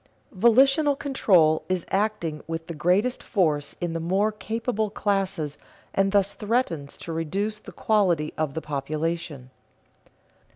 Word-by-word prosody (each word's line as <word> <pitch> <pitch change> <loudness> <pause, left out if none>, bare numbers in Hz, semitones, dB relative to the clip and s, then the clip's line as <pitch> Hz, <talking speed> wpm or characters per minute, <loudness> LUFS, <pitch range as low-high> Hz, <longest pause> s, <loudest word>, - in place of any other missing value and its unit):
_Volitional 270 +7 +4
control 180 - +3
is 185 -2 -1
acting 195 -7 -1
with 165 0 -4
the 170 - -6
greatest 180 - +1
force 155 - 0
in 175 -2 -2
the 165 - -2
more 190 +6 +1
capable 220 +1 -2
classes 195 -8 -1 0.3
and 195 0 +2
thus 200 -1 +2
threatens 210 - -2
to 165 - -6
reduce 195 +7 -2
the - - -12
quality 180 -8 +1
of 155 -3 -2
the 160 - -2
population. 150 -1 -4
185 Hz, 130 wpm, -25 LUFS, 160-215 Hz, 0.3 s, Volitional